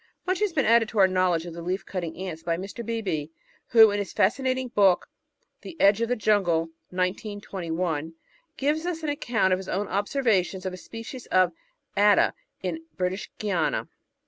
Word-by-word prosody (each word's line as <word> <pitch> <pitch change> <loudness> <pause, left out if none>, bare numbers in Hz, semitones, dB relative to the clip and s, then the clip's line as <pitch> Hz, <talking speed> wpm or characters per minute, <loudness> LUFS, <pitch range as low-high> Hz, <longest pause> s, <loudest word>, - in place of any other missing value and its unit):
Much 370 0 0
has 420 -2 +1
been 290 -5 +1
added 230 -1 +4
to 225 - -7
our 190 -2 +7
knowledge 185 -3 +1
of 170 - -7
the 170 - -7
Leaf 185 +3 -3
cutting 170 -4 -4
Ants 180 -3 -5
by 165 0 -1
Mr. 195 +5 -6
Beebe, 205 -10 -2 0.4
who, 225 -3 +7
in 205 - -1
his 200 - -4
fascinating 255 +4 +1
book 200 -6 +3 0.5
The 335 - -10
Edge 200 +3 +5
of 230 - 0
the 245 - +2
Jtmgle 185 -7 +2 0.2
(1921), 180 -4 -3 0.4
gives 305 +5 0
us 330 -2 -3
an 305 - -1
account 235 -9 +1
of 185 - +1
his 190 - -8
own 200 +2 -1
observations 200 -3 0
of 185 - -2
a - - -6
species 230 +5 -9
of 185 -1 +3 0.4
Atta 205 +1 +5 0.3
in 325 0 -3
British 185 +2 -2
Guiana. 190 -7 -1
200 Hz, 175 wpm, -26 LUFS, 180-230 Hz, 0.5 s, our